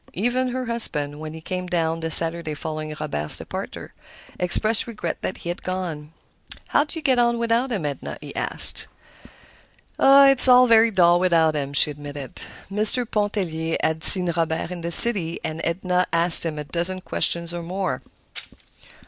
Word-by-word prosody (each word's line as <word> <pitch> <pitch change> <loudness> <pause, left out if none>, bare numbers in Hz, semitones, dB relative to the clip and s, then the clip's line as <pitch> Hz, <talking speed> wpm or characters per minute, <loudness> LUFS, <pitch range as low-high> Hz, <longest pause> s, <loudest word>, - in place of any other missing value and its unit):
Even 245 +6 -2
her 255 +1 -5
husband, 150 -11 0
when 155 0 -9
he 160 - -11
came 180 +2 -6
down 165 -2 -2
the 165 0 -5
Saturday 165 -1 +5
following 155 0 -7
Robert's 75 +1 -1
departure, - - -9 0.5
expressed 215 +6 0
regret 230 -2 -6
that - - -5
he - - -4
had 175 - -6
gone. 170 -5 -6 0.6
"How 290 - +1
do 310 - -10
you 320 - -8
get 260 -4 +1
on 235 0 +1
without 235 +2 -1
him, 195 -9 -4
Edna?" 145 -2 -6
he - - -12
asked. - - +2 1.1
"It's 275 -1 +7
very 240 -3 +5
dull 175 -4 +2
without 165 -3 +1
him," 140 -1 -5
she 150 - +3
admitted. 145 -2 -10 0.3
Mr. 215 +4 +1
Pontellier 190 -7 -3
had 160 +1 -2
seen 180 -2 +5
Robert 165 0 -3
in 180 -1 -8
the 170 - -5
city, 170 -4 +4
and 155 +1 -6
Edna 180 +1 -2
asked 170 0 +4
him 155 -2 -6
a 150 - -5
dozen 170 +6 -2
questions 170 -1 -3
or 175 - -6
more. 185 +3 -5
175 Hz, 165 wpm, -21 LUFS, 160-220 Hz, 1.1 s, It's